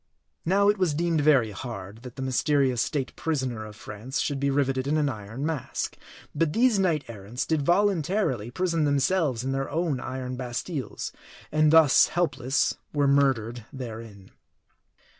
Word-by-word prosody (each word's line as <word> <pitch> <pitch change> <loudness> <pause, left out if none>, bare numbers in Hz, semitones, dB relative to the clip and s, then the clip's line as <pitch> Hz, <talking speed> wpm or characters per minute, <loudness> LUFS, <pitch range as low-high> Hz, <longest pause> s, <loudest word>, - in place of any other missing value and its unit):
Now 195 +4 +3
it 205 -1 +3
was 175 -6 +1
deemed 165 -1 +1
very 135 -7 +4
hard, 105 -1 -7
that 125 -1 -10
the 130 - -5
mysterious 130 -1 +2
state 135 0 -2
prisoner 130 -8 -2
of 105 - -11
France 105 +6 -6
should 145 -2 -1
be 140 +1 +1
riveted 135 -1 0
in 150 +2 +2
an 150 -2 +2
iron 110 +3 -5
mask; 155 -5 -3 0.4
but 150 0 0
these 235 -3 +3
knight 165 -6 +1
errants 110 +2 -5
did 160 -2 +1
voluntarily 175 - +1
prison 165 +3 0
themselves 145 -3 +1
in 135 - -2
their 135 0 -2
own 160 -3 -1
iron 130 0 -5
Bastiles; 130 +4 -4 0.4
and 155 0 +4
thus 160 -4 +7
helpless 145 -6 0 0.2
were 145 -1 +2
murdered 125 -5 +2
there 120 -5 -6
in. 100 -4 -14
140 Hz, 160 wpm, -26 LUFS, 125-160 Hz, 0.4 s, thus